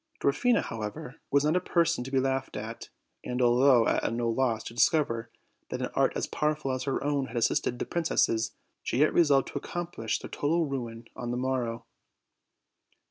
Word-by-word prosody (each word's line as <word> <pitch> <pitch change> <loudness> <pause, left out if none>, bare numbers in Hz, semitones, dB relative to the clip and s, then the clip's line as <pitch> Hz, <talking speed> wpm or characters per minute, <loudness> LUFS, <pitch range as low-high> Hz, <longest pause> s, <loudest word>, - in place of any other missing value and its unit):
Dwarfina, 235 - +2
however, 120 +6 -6
was 140 0 +3
not 155 +3 +2
a - - +4
person 170 -7 +1
to 130 - -7
be 135 -1 +2
laughed 135 0 -1
atj 110 +2 -6 0.3
and, 125 0 -3
although 125 0 +5
at - - +1
no 115 0 0
loss 115 -2 0
to 115 - -8
discover 115 -3 +2 0.4
that - - -4
an - - -3
art - - +2
as - - -1
pow 150 0 0
erful 135 -3 -3
as 130 0 -3
her 135 - -1
own 140 -2 0
had 125 - -6
assisted 120 +1 +1
the - - -3
princesses, 135 -9 +1 0.3
she - - -2
yet 150 +3 +4
re 175 - +6
solved 140 -4 +3
to - - -4
accomplish 175 -10 -3
their - - -10
total 165 +3 +1
ruin 120 -5 -5
on 120 - -5
the 120 - -1
morrow. 125 -3 -2
130 Hz, 190 wpm, -28 LUFS, 115-145 Hz, 0.4 s, re